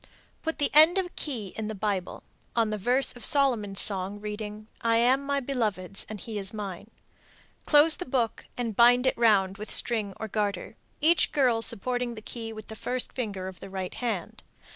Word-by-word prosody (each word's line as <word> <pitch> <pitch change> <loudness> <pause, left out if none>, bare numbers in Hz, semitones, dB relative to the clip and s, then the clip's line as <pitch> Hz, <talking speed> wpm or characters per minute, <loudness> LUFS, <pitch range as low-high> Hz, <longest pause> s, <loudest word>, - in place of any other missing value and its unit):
Put 320 -1 -3
the 290 -2 0
end 315 +5 +7
of 380 - +1
a - - -9
key 225 - -3
in 220 -1 -4
the 220 - -4
Bible, 195 -2 -3 0.3
on 225 -2 +2
the 215 - -2
verse 250 +7 +1
of 245 - -10
Solomon's 230 -9 +3
Song 195 0 +3
reading, 210 0 -6 0.2
"I 230 0 +2
am 255 +4 +3
my 280 0 0
beloved's 215 -8 -3
and 215 -1 -6
he 215 +1 -5
is 195 0 -2
mine;" 200 -1 -6 0.8
close 300 +1 +6
the 360 - -5
book 245 -3 -1
and 230 -4 -3
bind 245 +2 +5
it 260 - +2
round 200 -4 +3
with 215 - -7
string 215 -5 +1
or 220 - -4
garter, 205 -1 -3 0.3
each 325 +3 +4
girl 250 -6 +2
supporting 245 +2 -1
the 215 - -9
key 225 -1 -6
with 215 -1 -10
the 220 - -8
first 250 +4 -2
finger 200 -7 -4
of 190 -1 -9
the 195 - -9
right 190 -1 -5
hand. 225 -8 -4
225 Hz, 195 wpm, -27 LUFS, 205-250 Hz, 0.8 s, end